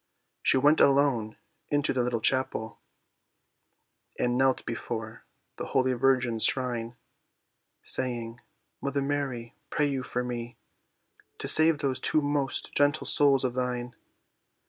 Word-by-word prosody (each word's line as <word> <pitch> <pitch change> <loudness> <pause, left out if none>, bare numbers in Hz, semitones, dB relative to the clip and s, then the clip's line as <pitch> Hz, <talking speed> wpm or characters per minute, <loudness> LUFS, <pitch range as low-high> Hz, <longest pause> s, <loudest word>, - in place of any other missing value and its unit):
She - - +2
went 145 +4 +3
alone 135 -6 +1 0.3
into 145 +1 0
the 130 - -1
little 120 -2 -2
chapel, 130 -4 0 1.4
And 120 0 -1
knelt 130 0 0
before 110 -1 -7 0.3
the - - -6
holy 130 0 +1
virgin's 125 -3 +1
shrine, 120 -3 0 0.9
Saying, 120 -2 -1 0.4
"Mother 140 0 -2
Mary, 135 -5 -4 0.2
pray 150 - 0
you 140 -2 -2
for 125 -1 -4
me, 120 -1 -7 0.8
To - - -5
save 160 0 +8
those 140 -3 0
two 155 - +1
most 145 -2 -2
gentle 145 +2 +1
souls 140 -2 +3
of 125 -2 -2
thine." 125 -1 -4
130 Hz, 125 wpm, -26 LUFS, 120-140 Hz, 1.4 s, save